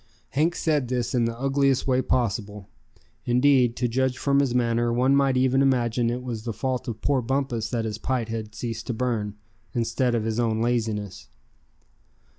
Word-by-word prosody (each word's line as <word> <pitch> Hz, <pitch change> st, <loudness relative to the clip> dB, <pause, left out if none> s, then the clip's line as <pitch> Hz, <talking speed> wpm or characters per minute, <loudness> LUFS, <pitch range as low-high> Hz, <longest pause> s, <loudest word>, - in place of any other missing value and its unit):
Hank 160 Hz, +5 st, +1 dB
said 150 Hz, -5 st, 0 dB
this 125 Hz, -1 st, -2 dB
in 120 Hz, -2 st, +2 dB
the 115 Hz, 0 st, -3 dB
ugliest 135 Hz, 0 st, +2 dB
way 130 Hz, -1 st, +2 dB
possible. 105 Hz, -5 st, -2 dB, 0.6 s
Indeed, 125 Hz, -1 st, +3 dB
to 125 Hz, -, 0 dB
judge 130 Hz, +2 st, 0 dB
from 140 Hz, 0 st, +2 dB
his 135 Hz, -3 st, +1 dB
manner, 120 Hz, -1 st, +1 dB
one 130 Hz, +3 st, +3 dB
might 135 Hz, -2 st, +3 dB
even 130 Hz, +1 st, +3 dB
imagine 120 Hz, -3 st, +2 dB
it 125 Hz, +1 st, -3 dB
was 120 Hz, -3 st, -4 dB
the 115 Hz, -1 st, -3 dB
fault 130 Hz, +2 st, -3 dB
of 110 Hz, -2 st, -5 dB
poor 140 Hz, -2 st, +2 dB
Bumpus 125 Hz, -3 st, -1 dB
that 115 Hz, -2 st, -2 dB
his 110 Hz, 0 st, -4 dB
pipe 125 Hz, -2 st, -1 dB
had 110 Hz, -2 st, -5 dB
ceased 115 Hz, 0 st, -5 dB
to 120 Hz, -, -2 dB
burn, 110 Hz, -4 st, -2 dB, 0.4 s
instead 120 Hz, +1 st, 0 dB
of 115 Hz, -, 0 dB
his 110 Hz, +1 st, -1 dB
own 110 Hz, -2 st, +1 dB
laziness. 110 Hz, -4 st, -2 dB
120 Hz, 180 wpm, -25 LUFS, 115-130 Hz, 0.6 s, Indeed